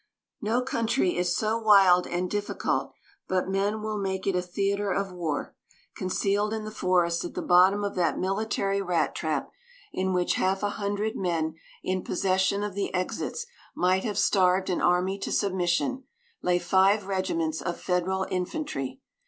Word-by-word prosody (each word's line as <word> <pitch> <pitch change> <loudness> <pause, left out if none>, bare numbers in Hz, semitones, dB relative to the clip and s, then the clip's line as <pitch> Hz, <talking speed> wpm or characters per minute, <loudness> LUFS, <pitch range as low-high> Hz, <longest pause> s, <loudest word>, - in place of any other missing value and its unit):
No 230 +3 +1
country 230 -6 0
is 175 0 0
so 220 +1 0
wild 195 -5 +6
and 175 +1 -1
difficult 205 +2 -2 0.4
but 185 -1 0
men 200 +3 0
will 215 -1 -2
make 190 -1 -2
it 195 - +1
a 180 - +2
theater 200 +3 -1
of 195 +1 -1
war; 165 -5 -3 0.4
concealed 200 +3 0
in 220 - -4
the 215 - -6
forest 175 -4 +1
at 175 - -6
the - - -2
bottom 185 +3 +5
of 200 - -2
that 175 -2 +1
military 195 0 0
rat 180 -3 0
trap, - - -2 0.4
in 190 0 0
which 180 -1 +1
half 190 +2 +1
a 205 - +2
hundred 205 +1 -2
men 165 -4 -1 0.3
in 185 0 -1
possession 190 +2 +1
of 210 -2 -3
the 200 0 -2
exits 185 - -2 0.3
might 185 +1 +2
have 210 -4 -2
starved 190 -2 +3
an 180 - -1
army 185 +2 +2
to - - -4
submission, 195 +7 0 0.4
lay 180 0 +2
five 190 +3 +3
regiments 170 -5 -1
of 175 -1 -3
Federal 185 +1 0
infantry. 180 - -3
190 Hz, 160 wpm, -27 LUFS, 180-205 Hz, 0.4 s, wild